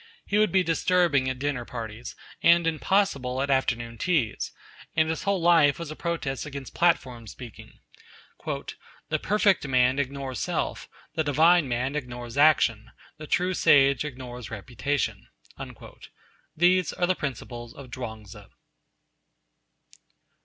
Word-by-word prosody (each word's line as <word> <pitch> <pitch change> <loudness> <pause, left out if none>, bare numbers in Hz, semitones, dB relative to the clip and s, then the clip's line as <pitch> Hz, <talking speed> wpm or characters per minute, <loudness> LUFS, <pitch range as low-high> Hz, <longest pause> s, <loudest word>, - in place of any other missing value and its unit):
He 205 - +1
would 215 - +3
be 190 -1 +3
disturbing 165 -5 +2
at 130 - -3
dinner 135 -2 -2
parties, 115 -1 -7 0.3
and 170 0 +5
impossible 160 -6 0
at 140 +1 0
afternoon 120 -3 -1
teas, 155 - 0 0.4
and 155 0 +3
his 160 - -3
whole 200 -1 +1
life 165 -4 +4
was 165 -3 -6
a - - -6
protest 160 -6 -3
against 140 -3 -8
platform 130 -9 +1
speaking. 115 +1 -11 0.7
'The 155 +1 -5
perfect 205 -6 +2
man 130 +1 +3
ignores 135 -2 -3
self; - - -3 0.2
the 160 - 0
divine 155 +2 +4
man 125 +3 -2
ignores 125 -4 -6
action; 140 -7 +3 0.3
the 155 - -9
true 180 +4 +1
sage 140 -5 +4
ignores 125 -5 -7
reputation.' 125 +6 -3 1.3
These 180 +2 +3
are 175 - 0
the 185 - +2
principles 120 -6 -6
of 130 -3 -11
Chuang 110 -3 -6
Tzu. 105 0 -12
140 Hz, 130 wpm, -26 LUFS, 125-165 Hz, 1.3 s, and